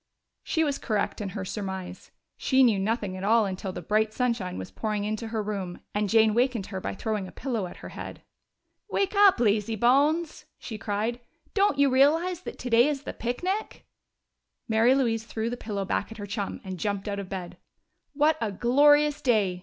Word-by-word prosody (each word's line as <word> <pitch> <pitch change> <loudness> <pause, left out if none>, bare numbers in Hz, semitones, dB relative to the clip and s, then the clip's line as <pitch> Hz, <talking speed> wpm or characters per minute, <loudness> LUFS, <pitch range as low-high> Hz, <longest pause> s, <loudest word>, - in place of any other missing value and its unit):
She 320 - 0
was 285 -3 -1
correct 215 -1 -1
in 200 - -3
her 190 0 -5
surmise: 190 -2 -6 0.3
she 265 0 +3
knew 225 -6 +4
nothing 205 -1 -1
at 185 - -6
all 220 +2 +4
until 190 0 -4
the 180 -1 -7
bright 215 +4 +1
sunshine 230 -8 -1
was 95 - -7
pouring 215 -2 -2
into 215 +2 -3
her 220 -1 -2
room 195 -4 -4
and 210 -1 0
Jane 220 0 +5
wakened 240 -3 +1
her 190 - -3
by - - -4
throwing 210 -1 -2
a - - -11
pillow 230 -8 -3
at - - -11
her - - -6
head. - - -8 0.7
"Wake 395 +1 0
up, 400 -1 +6
lazybones!" 240 +9 +2
she 220 -3 -7
cried. 215 +4 -2 0.3
"Don't 400 -7 +2
you 280 0 +5
realize 320 +7 +3
that - - -8
today 240 +1 +3
is 290 -2 -2
the - - -5
picnic?" 365 - -3 0.8
Mary 225 +3 +4
Louise 230 -5 +1
threw 230 0 -3
the - - -2
pillow 205 -4 -4
back 200 - -2
at 225 - -9
her 205 - -6
chum 200 0 -4
and 185 -2 -6
jumped 200 +1 -2
out 200 -1 -2
of 195 -2 -6
bed. 185 -2 -6 0.6
"What 300 +2 +3
a 220 -2 -1
glorious 290 +7 +4
day!" 210 -9 +2
220 Hz, 190 wpm, -27 LUFS, 200-265 Hz, 0.8 s, up